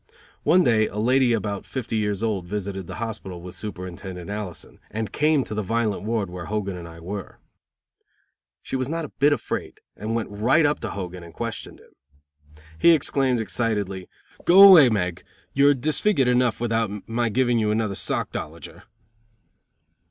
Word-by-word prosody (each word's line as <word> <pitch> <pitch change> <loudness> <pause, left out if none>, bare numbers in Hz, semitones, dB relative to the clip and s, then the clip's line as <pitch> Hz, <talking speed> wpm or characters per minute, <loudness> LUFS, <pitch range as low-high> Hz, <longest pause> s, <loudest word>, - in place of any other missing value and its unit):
One 180 +1 +4
day 110 -4 +3
a 105 - -8
lady 125 +3 +3
about 105 -3 -2
fifty 125 -4 -4
years 105 -1 -1
old 100 -6 -1
visited 95 -2 -4
the - - -7
hospital 110 -6 -6
with 90 +1 -9
Superintendent 90 -1 -7
Allison, 105 -5 -7
and 110 0 -4
came 150 -2 +2
to - - -7
the 105 - -1
violent 110 0 -1
ward 110 -1 -1
where 90 -1 -7
Hogan 100 -3 -3
and 85 -1 -8
I 85 0 -12
were. 95 +2 -7 1.3
She - - -4
was 130 0 -1
not 165 0 -2
a - - -9
bit 145 +2 +5
afraid, 145 - -3 0.2
and 110 +2 -3
went 115 -3 -3
right 120 +10 +3
up 145 +1 +1
to 115 - -4
Hogan 90 -2 -6
and 85 -2 -13
questioned - - -5
him. - - -21 0.9
He 170 - +7
exclaimed, 135 -5 +1
excitedly, 100 -2 -2 0.3
"Go 195 +3 +9
away, 165 -9 +9
Meg. 90 -6 -1 0.3
You're 140 +1 +5
disfigured 150 +2 +1
enough 125 -1 +2
without 115 -3 -2
my 115 +1 0
giving 120 +1 +2
you 105 -1 +1
another 105 -1 0
sockdolager." 80 -4 -5
110 Hz, 165 wpm, -24 LUFS, 95-125 Hz, 1.3 s, Go